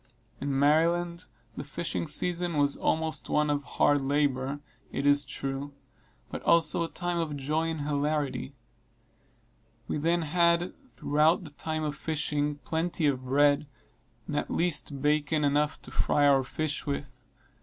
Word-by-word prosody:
In 140 -1 -1
Maryland, 170 +4 +2 0.3
the - - -5
fishing 165 +3 -3
season 175 +1 0
was 145 -1 +3
always 160 0 0
one 150 0 +2
of 145 -1 0
hard 145 +2 +2
labor, 140 0 0 0.3
it 140 - -3
is 145 0 +4
true, 135 +1 -5 0.6
but - - -5
also 170 0 +3
a - - -2
time 175 -1 -2
of 155 -3 -2
joy 155 +4 -1
and 160 -2 -3
hilarity. 145 -1 -1 1.3
We - - -2
then 170 +2 +1
had, 170 +2 +2 0.2
throughout 155 +5 +2
the 155 - -9
time 155 +2 -3
of 150 -1 -2
fishing, 150 -1 -1
plenty 165 0 -1
of 130 -3 0
bread, 145 +2 +3 0.6
and 150 - -4
at 145 - -1
least 150 -5 -1
bacon 150 +1 +2
enough 150 +2 +1
to - - -7
fry 145 -1 +2
our 140 -1 +5
fish 150 +4 -3
with. 130 -3 -5
150 Hz, 145 wpm, -28 LUFS, 145-160 Hz, 1.3 s, our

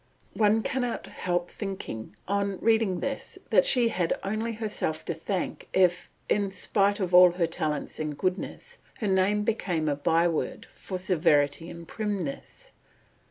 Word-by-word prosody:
One 215 0 +3
cannot 245 -3 -2
help 175 -1 -2
thinking, 190 - -6
on 200 -1 0
reading 220 -5 +2
this, 275 0 -4
that - - +5
she 245 - +5
had 180 -6 -1
only 220 +3 -2
herself 210 -8 -3
to 170 - -2
thank 180 +4 -4
if, 180 -1 +2 0.2
in 200 -1 +1
spite 200 +1 +1
of 185 -2 -2
all 180 -1 +8
her 175 -1 +1
talents 155 -2 -3
and 155 -2 -3
goodness, 195 - -3 0.2
her 215 - -2
name 195 +2 +2
became 180 -8 -1
a 145 - +1
byword 165 +3 0
for 185 - -6
severity 165 -4 +2
and 170 -1 -10
primness. 200 -10 -5
190 Hz, 145 wpm, -27 LUFS, 170-210 Hz, 0.2 s, all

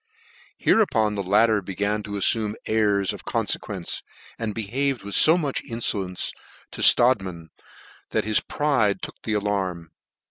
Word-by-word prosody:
Hereupon 110 - +2
the 100 - -2
latter 105 +3 +3
began 100 +3 -2
to 105 0 -8
afl'ume 105 +1 +1
airs 105 -3 +1
of - - -10
confequence, - - -3 0.4
and 110 -2 -3
behaved 125 +4 -1
with 100 0 -7
fo 160 +3 +6
much 145 -6 -2
infolencc 100 -6 -3 0.4
to - - -7
Strodtman, 95 -10 +4 0.6
that - - -1
his 110 -1 +3
pride 120 -10 0
took - - -8
the 110 - -3
alarm. 95 -5 -2
105 Hz, 135 wpm, -24 LUFS, 100-115 Hz, 0.6 s, fo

